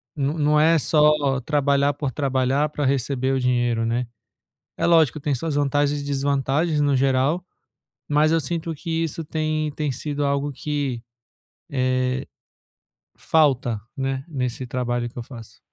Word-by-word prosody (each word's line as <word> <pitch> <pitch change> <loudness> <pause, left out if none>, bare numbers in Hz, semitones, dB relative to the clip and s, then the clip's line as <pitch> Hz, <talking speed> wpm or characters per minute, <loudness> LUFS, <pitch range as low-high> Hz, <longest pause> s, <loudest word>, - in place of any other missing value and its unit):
não 145 +1 -1
não 150 0 +3
é 165 +2 +5
só 150 -3 +3
trabalhar 140 0 +2
por 145 -1 -3
trabalhar 135 +2 +1
para 150 -1 -3
receber 135 0 0
o 135 - +1
dinheiro, 120 -2 +1
né? 120 +2 -1 0.7
É - - +1
lógico, 160 -5 +4
tem 145 0 0
suas 155 +4 -3
vantagens 145 0 +1
e - - -6
desvantagens 140 +3 0
no 145 -1 +2
geral, 135 +6 +1 0.6
mas 150 +2 +3
eu 165 - +3
sinto 165 +2 -3
que 155 +3 -7
isso 165 +1 -4
tem 155 0 -1
tem 150 -1 -2
sido 145 +2 -3
algo 140 +1 0
que, 140 -3 -3 2.2
eh, - - -38
falta, 130 -8 +2 0.2
né? 135 -1 -2
Nesse 130 -4 -3
trabalho 120 -1 -2
que 125 - -11
eu - - -3
faço. 115 -2 -12
140 Hz, 150 wpm, -23 LUFS, 130-150 Hz, 2.2 s, é